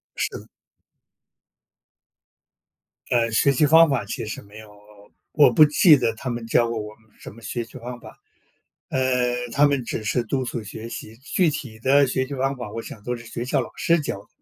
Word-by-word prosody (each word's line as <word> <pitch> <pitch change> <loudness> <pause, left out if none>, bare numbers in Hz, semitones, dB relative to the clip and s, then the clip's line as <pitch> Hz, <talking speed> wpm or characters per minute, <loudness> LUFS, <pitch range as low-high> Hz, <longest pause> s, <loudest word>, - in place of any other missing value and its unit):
是 - - 0
的。 - - -14 2.6
呃， 115 -2 +1
学 140 +5 +3
习 145 +3 +3
方 160 +1 +6
法 130 -6 -1
其 115 +3 -5
实 110 - -6
没 105 +2 -14
有， 105 -1 -13 0.6
我 145 -5 +5
不 155 +6 +7
记 150 +1 +6
得 120 -3 0
他 125 +3 -6
们 120 -1 -4
教 115 +1 +2
过 115 -1 -3
我 105 0 -7
们 110 -1 -29
什 - - -10
么 115 - -15
学 120 +1 -4
习 115 - -12
方 120 +1 -8
法。 - - -13 0.7
呃， 125 -2 0 0.2
他 145 +4 +4
们 140 -3 +1
只 110 - -4
是 120 +3 0
督 130 +3 -2
促 120 -2 -4
学 110 +3 -8
习。 110 -1 -8
具 155 +7 0
体 130 -7 -7
的 140 +3 +4
学 130 +1 -1
习 140 - -6
方 135 +1 -1
法， 120 -4 -7
我 115 - -5
想 105 - -10
都 125 +3 -3
是 115 - -12
学 120 - -5
校 125 - 0
老 - - -6
师 170 0 +2
教 140 -9 -4
的， - - -20
125 Hz, 220 characters per minute, -23 LUFS, 115-135 Hz, 2.6 s, 不